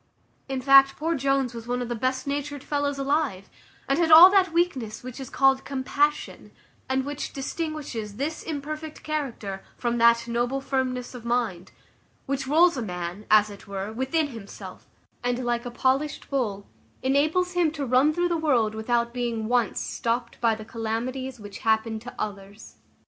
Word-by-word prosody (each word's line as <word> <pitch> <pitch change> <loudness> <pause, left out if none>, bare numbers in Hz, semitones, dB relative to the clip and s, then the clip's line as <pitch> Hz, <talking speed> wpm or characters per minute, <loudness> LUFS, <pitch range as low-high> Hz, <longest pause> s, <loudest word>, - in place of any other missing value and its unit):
In 265 -1 -2
fact, 275 +1 +7
poor 325 +2 0
Jones 275 -3 0
was 230 0 -8
one 245 +1 -1
of 245 - -3
the 240 - -2
best 255 +3 -1
natured 285 0 -3
fellows 285 -1 -1
alive, 275 -8 -1 0.4
and 275 +4 +1
had 330 -2 +2
all 340 +4 +11
that 385 -3 +4
weakness 300 -12 -1
which 255 +1 -8
is 265 - -7
called 270 0 +3
compassion, 285 +2 -1 0.4
and 265 0 0
which 290 0 -5
distinguishes 275 -7 -4
this 290 +7 -3
imperfect 310 0 -6
character 245 -11 -4 0.2
from 240 -1 -1
that 235 0 +4
noble 240 +3 0
firmness 260 -2 -2
of 245 -2 -9
mind, 230 -7 -1 0.5
which 275 0 -2
rolls 330 +2 +4
a - - -2
man, 180 0 -5
as 215 0 +5
it 200 +2 -13
were, 200 +2 -5
within 275 +6 0
himself, 225 -6 -10 0.4
and 245 0 -1
like 240 0 -1
a - - -3
polished 265 +5 -1
bowl, 210 -7 -1 0.4
enables 305 +7 +2
him 350 -3 +3
to 295 -2 -4
run 260 +4 +4
through 350 +3 0
the 340 - +1
world 250 -9 +2
without 235 +2 0
being 235 -3 -2
once 240 -2 +1
stopped 235 0 -3
by 230 -2 +3
the 215 0 -9
calamities 245 +3 -4
which 205 -2 -9
happen 220 0 +1
to 245 +3 -9
others. 200 0 -7
255 Hz, 170 wpm, -25 LUFS, 230-285 Hz, 0.5 s, all